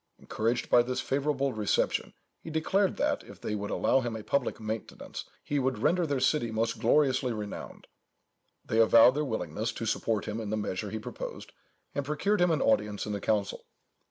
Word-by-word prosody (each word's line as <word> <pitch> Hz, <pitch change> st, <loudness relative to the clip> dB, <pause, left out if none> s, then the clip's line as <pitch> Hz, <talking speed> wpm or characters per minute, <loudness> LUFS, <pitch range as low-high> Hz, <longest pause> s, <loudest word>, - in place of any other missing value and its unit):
Encouraged 115 Hz, +3 st, -1 dB
by 120 Hz, -, +6 dB
this 125 Hz, +1 st, -2 dB
favourable 140 Hz, -1 st, 0 dB
reception, 105 Hz, -2 st, 0 dB, 0.2 s
he -, -, -9 dB
declared 185 Hz, +5 st, +1 dB
that, -, -, 0 dB
if -, -, -13 dB
they -, -, -3 dB
would 105 Hz, -1 st, -3 dB
allow -, -, +2 dB
him 120 Hz, -3 st, -3 dB
a 110 Hz, -, -6 dB
public 125 Hz, +4 st, -1 dB
maintenance, 110 Hz, 0 st, -6 dB, 0.2 s
he 145 Hz, -, -1 dB
would 130 Hz, -2 st, 0 dB
render 170 Hz, +9 st, +2 dB
their 140 Hz, -2 st, 0 dB
city 130 Hz, -2 st, +2 dB
most 110 Hz, 0 st, -1 dB
gloriously 130 Hz, +1 st, +3 dB
renowned. 105 Hz, -2 st, -6 dB, 0.8 s
They 110 Hz, -, 0 dB
avowed 115 Hz, +2 st, +7 dB
their 150 Hz, +2 st, 0 dB
willingness 110 Hz, -, -2 dB
to 115 Hz, -, -5 dB
support 110 Hz, -1 st, 0 dB
him 115 Hz, -, -3 dB
in 105 Hz, -, -5 dB
the 110 Hz, -, -1 dB
measure 105 Hz, 0 st, -3 dB
he 110 Hz, -, -4 dB
proposed, 105 Hz, -, -7 dB, 0.4 s
and 140 Hz, -, -1 dB
procured 175 Hz, +8 st, 0 dB
him 180 Hz, -, +5 dB
an 160 Hz, -, +2 dB
audience 105 Hz, -2 st, +1 dB
in 105 Hz, -, -3 dB
the 100 Hz, -, -3 dB
council. 105 Hz, -3 st, -1 dB
115 Hz, 185 wpm, -29 LUFS, 110-140 Hz, 0.8 s, avowed